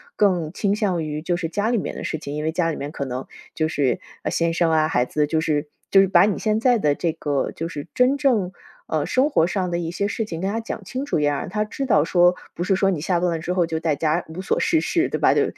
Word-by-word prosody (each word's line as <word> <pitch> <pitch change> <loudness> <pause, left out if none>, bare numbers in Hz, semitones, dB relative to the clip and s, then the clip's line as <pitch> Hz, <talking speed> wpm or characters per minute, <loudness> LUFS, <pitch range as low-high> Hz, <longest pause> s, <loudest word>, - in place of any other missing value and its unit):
更 180 -6 +1
倾 200 +1 0
向 195 -6 0
于， 150 0 -4
就 175 +2 0
是 170 -2 -3
家 205 +4 0
里 240 - +2
面 195 - -3
的 - - -5
事 - - -2
情， 145 -2 -7
因 150 +1 -3
为 160 - -1
家 165 -1 +1
里 - - -5
面 145 +2 -5
可 - - -3
能 130 -1 -5 0.3
就 155 - 0
是 140 -6 0 0.3
先 165 0 +1
生 165 -1 +2
啊， 155 -1 +3
孩 125 -6 +2
子。 150 +4 0
就 160 +1 0
是 150 -1 0 0.3
就 195 - +8
是 195 - +3
把 180 -1 +5
你 210 - -1
现 215 0 +1
在 245 0 +3
的 150 -7 +2
这 170 +1 0
个 145 -4 -1
就 165 - -4
是 150 -1 -7
真 255 +3 +3
正， 240 -10 +2 0.4
嗯， 155 -2 0
生 265 +3 +2
活 165 - +3
上 185 0 -1
的 170 - -1
一 165 -1 -3
些 200 +3 -1
事 220 +2 -2
情 165 -5 -6
跟 195 - 0
他 225 - -1
讲 225 -2 -6
清 255 +8 -4
楚， 285 - 0
也 145 0 +2
让 145 - -2
他 210 +3 0
知 270 +5 -4
道 155 - +4
说， 175 +2 +4 0.2
不 175 - -2
是 190 +2 +2
说 195 +1 +2
你 180 -6 -1
下 175 +2 0
班 180 +1 +1
了 165 - -1
之 170 +3 -3
后 180 -2 +2
就 160 -1 -2
在 160 -2 0
家 155 +3 0
无 160 +3 -7
所 190 - 0
事 320 -2 +2
事， 355 -1 +1
对 - - -3
吧， - - +4
就 - - +4
175 Hz, 310 characters per minute, -22 LUFS, 155-205 Hz, 0.4 s, 就